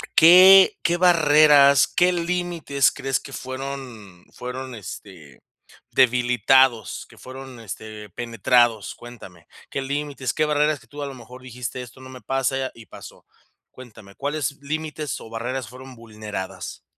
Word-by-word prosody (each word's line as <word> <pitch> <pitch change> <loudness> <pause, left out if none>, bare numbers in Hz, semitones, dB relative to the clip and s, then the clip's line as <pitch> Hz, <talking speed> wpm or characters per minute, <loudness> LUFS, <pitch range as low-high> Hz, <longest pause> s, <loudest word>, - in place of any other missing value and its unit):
¿qué 185 +3 +8
qué 170 +1 +1
barreras, 150 -5 +5
qué 180 +1 +2
límites 170 -5 0
crees 135 -1 -2
que 140 - -12
fueron 130 -9 -8
fueron, 125 0 -7
este, 90 -7 -11 0.5
debilitados 125 -1 +2
que - - -18
fueron, 130 -1 -11
este, 110 0 -9
penetrados? 115 0 +1
Cuéntame. 110 -8 -14 0.2
¿Qué 135 - -3
límites? 140 -1 -4
¿Qué 155 - 0
barreras 150 -1 +1
que - - -22
tú 145 0 -10
a 140 - -4
lo 135 - -8
mejor 125 +1 -13
dijiste 125 0 -7
esto 125 +1 -12
no 130 - -12
me 130 -1 -11
pasa 135 +2 -2
y 115 -1 -14
pasó? - - -14 0.5
Cuéntame, 110 -6 -14
¿cuáles 145 -1 -3
límites 155 -1 -5
o 110 - -12
barreras 120 +2 -4
fueron 130 +1 -12
vulneradas? 105 -5 -8
130 Hz, 140 wpm, -22 LUFS, 115-145 Hz, 0.5 s, qué